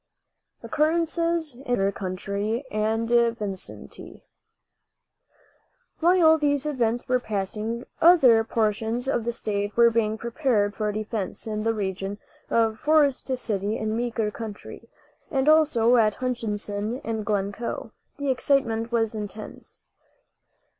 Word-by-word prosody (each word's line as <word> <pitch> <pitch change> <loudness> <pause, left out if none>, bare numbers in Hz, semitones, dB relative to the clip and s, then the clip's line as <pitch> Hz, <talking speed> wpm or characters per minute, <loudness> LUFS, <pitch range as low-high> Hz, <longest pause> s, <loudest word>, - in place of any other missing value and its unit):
OCCURRENCES 330 0 0
IN 240 - -16
MEEKER 195 -3 +2
COUNTY 200 +5 -3
AND 220 +2 0 0.3
VICINITY. 195 -4 -7 1.8
While 330 -2 +5
these 285 -1 +1
events 240 -5 -1
were 255 0 +2
passing, 215 +2 -3 0.2
other 270 -10 +6
portions 225 +2 -1
of 240 -4 0
the 235 - 0
state 205 -2 -3
were 235 0 +6
being 220 -1 0
prepared 235 -4 0
for 210 +1 -1
defense. 215 -1 -4
In 215 -1 -3
the 225 +1 0
region 195 0 -3 0.3
of 225 -1 +1
Forest 295 -3 +2
City 210 -3 -2
in 220 0 -2
Meeker 230 -2 -1
county, 215 -2 -9 0.4
and 270 -1 0
also 280 -7 +5
at 215 -2 +3
Hutchinson 220 -2 -3
and 220 -1 -3
Glencoe, 205 +2 -3 0.3
the 285 -1 0
excitement 240 -3 +1
was 225 -2 +1
intense. 210 0 -8
225 Hz, 115 wpm, -25 LUFS, 210-255 Hz, 1.8 s, other